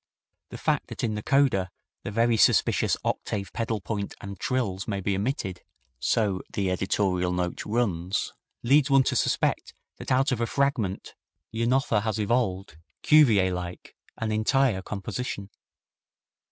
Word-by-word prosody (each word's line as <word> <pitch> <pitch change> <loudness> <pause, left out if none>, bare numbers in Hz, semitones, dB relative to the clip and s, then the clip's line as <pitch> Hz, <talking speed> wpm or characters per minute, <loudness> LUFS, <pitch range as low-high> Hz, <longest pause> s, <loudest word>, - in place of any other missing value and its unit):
The - - -8
fact - - 0
that - - -7
in 110 -2 0
the 105 - -3
coda 125 -8 +2 0.3
the - - -5
very 115 +2 +2
suspicious 110 - +3
octave 100 -2 -3
pedal 115 -1 -2
point 100 0 -4
and 100 -2 -8
trills 100 -7 -2
may 100 -3 -2
be 100 +1 -1
omitted 100 -4 -3 0.4
so 100 - +1
the 95 -2 -1
editorial 90 -1 0
note 90 -1 -2
urns 100 -5 -1 0.3
leads 140 +4 +4
one 135 -1 +5
to - - -1
suspect - - 0 0.2
that - - -7
out 135 +2 +3
of 120 -2 -1
a 115 - +1
fragment 125 -8 -1 0.4
Janotha 115 -1 +1
has 110 0 -2
evolved, 100 -6 -1 0.3
Cuvier 110 -12 +5
like, 90 0 -7 0.2
an 110 -1 -2
entire 110 0 +2
composition. 100 +1 -5
105 Hz, 140 wpm, -26 LUFS, 95-120 Hz, 0.4 s, one